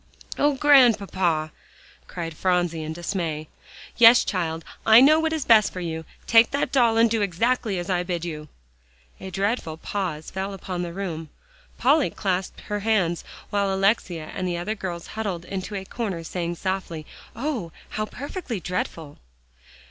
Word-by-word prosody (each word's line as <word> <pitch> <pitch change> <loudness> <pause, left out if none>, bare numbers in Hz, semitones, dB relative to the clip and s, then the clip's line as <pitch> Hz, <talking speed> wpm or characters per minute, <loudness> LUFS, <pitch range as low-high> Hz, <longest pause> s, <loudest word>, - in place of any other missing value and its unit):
"Oh, 290 0 +3
Grandpapa!" 200 - +4 0.6
cried 165 -2 -5
Phronsie 175 -2 0
in 155 0 -4
dismay. 165 -2 -3 0.5
"Yes, 235 +1 +8
child; 165 -4 -2 0.2
I 220 +1 +8
know 300 +5 +6
what 320 0 0
is 315 -4 -2
best 220 -3 +5
for 185 - -6
you. 160 -2 -4 0.2
Take 230 0 +6
that 280 - -1
doll, 235 -4 +3
and 230 +1 +6
do 225 -1 0
exactly 210 +2 0
as 175 0 -4
I 180 -2 +1
bid 175 -1 -3
you." 155 -3 -6 0.7
A 190 - -7
dreadful 195 -3 -2
pause 165 -4 -4
fell 195 +1 -3
upon 185 -1 -5
the 175 -1 -4
room. 170 -4 -5 0.5
Polly 285 +3 +3
clasped 190 -2 -2
her 210 0 -3
hands, 195 -6 +1 0.3
while 200 -1 +1
Alexia 190 -5 0
and 185 - -3
the 175 -1 -1
other 175 +5 -2
girls 180 -5 -5
huddled 195 -6 -3
into 195 +2 -5
a 190 -1 -4
corner 195 -7 -4
saying 175 +1 -3
softly, 180 -4 -3 0.3
"Oh! 240 - -3 0.2
how 215 - -2
perfectly 280 - -5
dreadful!" 165 -3 -4
190 Hz, 155 wpm, -24 LUFS, 170-225 Hz, 0.7 s, Yes